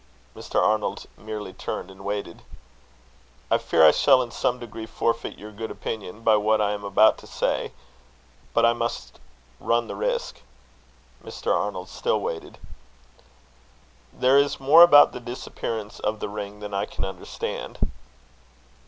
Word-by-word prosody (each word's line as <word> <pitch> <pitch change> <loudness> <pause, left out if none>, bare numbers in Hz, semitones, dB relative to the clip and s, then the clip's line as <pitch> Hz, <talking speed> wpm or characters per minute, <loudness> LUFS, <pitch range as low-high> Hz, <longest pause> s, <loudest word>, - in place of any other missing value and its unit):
Mr. - - -2
Arnold 105 -2 0
merely 105 -3 -7
turned 95 - -5
and 95 0 -14
waited. 100 -3 -4 1.1
"I - - +4
fear 80 -1 +4
I 75 - +9
shall 130 - +4
in 120 - -9
some 125 - 0
degree 115 -2 -8
forfeit 115 +1 -2
your 105 +1 -10
good 110 +2 -6
opinion 105 0 -6
by 110 -1 +5
what 110 +1 +2
I 105 -1 +1
am 105 -1 -4
about 100 +2 +4
to - - -14
say, - - -1 0.8
but 115 - +3
I 115 - +4
must 120 0 -4 0.4
run 115 0 +1
the - - -6
risk." - - -2 0.8
Mr. - - -2
Arnold - - -3
still 485 - -1
waited. 445 -6 -5 1.5
"There 130 - +4
is 140 0 0
more 145 +5 +7
about 150 -4 +8
the - - -7
disappearance 115 -3 -6
of 105 0 -2
the - - -4
ring 105 0 -7
than 105 -1 -7
I 100 +1 -1
can - - -5
understand." 95 -2 -6
110 Hz, 150 wpm, -24 LUFS, 105-125 Hz, 1.5 s, I